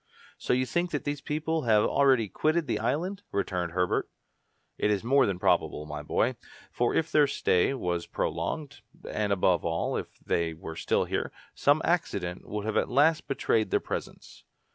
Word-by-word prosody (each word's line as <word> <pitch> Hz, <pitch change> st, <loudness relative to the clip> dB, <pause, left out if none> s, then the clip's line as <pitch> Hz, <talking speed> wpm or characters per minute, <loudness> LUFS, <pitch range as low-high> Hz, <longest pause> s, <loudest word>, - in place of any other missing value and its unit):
"So -, -, 0 dB
you 130 Hz, +1 st, +2 dB
think 175 Hz, +6 st, -1 dB
that 145 Hz, -4 st, -3 dB
these 145 Hz, -1 st, -3 dB
people 155 Hz, +2 st, -1 dB
have 105 Hz, -2 st, +4 dB
already 130 Hz, -6 st, +3 dB
quitted 155 Hz, -, 0 dB
the 105 Hz, -, -1 dB
island?" 165 Hz, -, -1 dB
returned 90 Hz, -3 st, -2 dB
Herbert. 90 Hz, 0 st, 0 dB, 0.7 s
"It -, -, +2 dB
is 105 Hz, -1 st, +1 dB
more 135 Hz, +3 st, +4 dB
than 95 Hz, -3 st, -1 dB
probable, 75 Hz, -3 st, +1 dB
my 75 Hz, 0 st, -6 dB
boy; 115 Hz, +11 st, 0 dB, 0.3 s
for 120 Hz, -1 st, 0 dB
if 160 Hz, 0 st, 0 dB
their 150 Hz, -1 st, +5 dB
stay 135 Hz, -3 st, +2 dB
was 90 Hz, -8 st, -2 dB
prolonged, 145 Hz, -2 st, -3 dB, 0.3 s
and 105 Hz, -1 st, -1 dB
above 90 Hz, -2 st, +2 dB
all, 85 Hz, 0 st, -1 dB
if -, -, -5 dB
they 85 Hz, -1 st, -1 dB
were 80 Hz, 0 st, -8 dB
still 80 Hz, -, +1 dB
here, -, -, -2 dB, 0.2 s
some 145 Hz, +2 st, +3 dB
accident 125 Hz, -, -1 dB
would 105 Hz, -1 st, -3 dB
have 110 Hz, -, -1 dB
at -, -, +1 dB
last 150 Hz, +5 st, +3 dB
betrayed 115 Hz, -5 st, +1 dB
their -, -, +2 dB
presence." -, -, -7 dB
120 Hz, 175 wpm, -28 LUFS, 90-145 Hz, 0.7 s, their